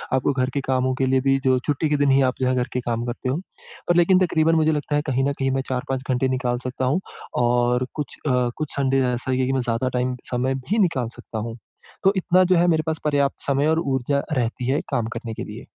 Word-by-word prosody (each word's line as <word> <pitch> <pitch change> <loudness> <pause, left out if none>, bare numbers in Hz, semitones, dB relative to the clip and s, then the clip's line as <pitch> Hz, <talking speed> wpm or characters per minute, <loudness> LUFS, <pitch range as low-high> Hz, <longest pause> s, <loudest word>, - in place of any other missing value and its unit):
आपको 130 +2 +1
घर 130 -1 0
के 140 - 0
कामों 130 0 0
के 130 0 0
लिए 130 0 +3
भी 135 0 +3
जो 130 -1 +3
छुट्टी 150 +1 0
के 150 - +2
दिन 145 0 +2
ही 135 - +5
आप - - -3
जो 130 - +2
है 130 - +2
घर 125 0 0
के 125 - 0
काम 120 0 -2
करते 120 +1 -3
हो 135 - 0 0.5
पर 175 - +4
लेकिन 175 +2 +5
तकरीबन 165 -1 +2
मुझे 160 0 +3
लगता 150 -1 -1
है 145 - +2
कहीं 135 0 +1
न - - -1
कहीं 135 0 +1
मैं 135 0 0
4-5 130 0 -2
घंटे 130 +1 +1
निकाल 125 -1 0
सकता 130 0 -2
हूँ। 145 +8 +2 0.4
और 120 +1 +2
कुछ 150 -4 -5
अ, 125 -2 +2
कुछ 155 -2 -4
संडे 135 -1 +2
ऐसा 125 +2 -3
ही 130 - +1
है - - +2
कि 135 - 0
मैं 130 - +1
ज़्यादा 120 +2 -1
टाइम 125 +1 0 0.2
समय 130 +2 0
भी 185 - -2
निकाल 135 - +1
सकता 110 - -8
हूँ। 115 +2 -5 0.5
तो 195 0 +5
इतना 185 0 +4
जो 185 0 +3
है 175 +1 +4
मेरे 160 -2 +2
पास 160 -1 -1
पर्याप्त 140 -2 +1
समय 140 +2 +2
और 160 +1 +2
ऊर्जा 140 -1 0
रहती 125 -1 -1
है 145 - +1
काम 115 -2 0
करने 115 -1 -5
के - - -5
लिए। - - -9
130 Hz, 260 wpm, -23 LUFS, 125-145 Hz, 0.5 s, ही